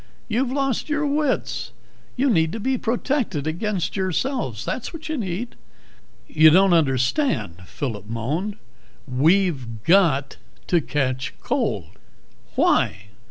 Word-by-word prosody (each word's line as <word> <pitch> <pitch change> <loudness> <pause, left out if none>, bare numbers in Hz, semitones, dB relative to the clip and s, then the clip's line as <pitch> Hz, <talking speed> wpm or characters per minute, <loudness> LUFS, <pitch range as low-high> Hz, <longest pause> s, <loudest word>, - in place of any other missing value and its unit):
"You've 245 +3 0
lost 270 0 -1
your 300 0 0
wits. 290 -1 -1 0.4
You 265 +1 +2
need 160 -5 +2
to 225 - -4
be 260 +5 0
protected 235 - -1
against 180 +4 -2
yourselves, 190 - -2
that's 250 - -3
what 320 -1 -8
you 315 - -1
need." 215 - -3 0.7
"You 155 0 +6
don't 185 +3 +5
understand," 130 - +1
Phillip 110 -8 -5
moaned. 145 - -2 0.5
"We've 135 - +1
got 160 - +3 0.3
to 175 -2 +2
catch 130 -3 -2
cold." - - -2 0.6
"Why?" 105 +2 +2
180 Hz, 115 wpm, -23 LUFS, -, 0.7 s, You